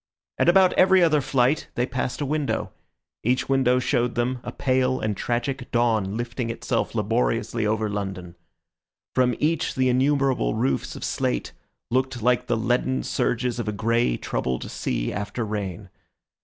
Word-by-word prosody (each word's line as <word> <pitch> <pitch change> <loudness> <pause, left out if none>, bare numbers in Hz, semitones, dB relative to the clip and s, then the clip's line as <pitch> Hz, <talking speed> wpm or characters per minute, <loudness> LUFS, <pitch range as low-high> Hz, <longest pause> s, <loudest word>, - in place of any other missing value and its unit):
At - - +4
about 185 +1 +5
every 185 -1 +5
other 155 -3 +4
flight 130 +2 +1
they 120 - +1
passed 125 - -3
a - - 0
window; 150 0 -1 0.5
each 125 +3 +1
window 130 -2 +3
showed 125 -1 0
them 125 +1 0
a - - -5
pale 130 0 +1
and 110 -1 -1
tragic 120 +4 -2
dawn 110 -4 +1
lifting 120 0 -3
itself 115 - -2
laboriously 85 - 0
over 110 0 0
London. 95 -4 -4 0.8
From 125 -1 +2
each 160 +1 0
the 130 -1 +2
innumerable 130 - +2
roofs 65 -1 -1
of - - -8
slate 60 -1 -1 0.4
looked 130 0 0
like 125 0 +2
the 120 - +1
leaden 120 +3 0
surges 125 0 -1
of 115 - -3
a - - +1
grey, 115 - +1
troubled 65 -1 -3
sea - - -2
after 105 +3 -3
rain. 100 -2 -5
120 Hz, 155 wpm, -24 LUFS, 105-130 Hz, 0.8 s, about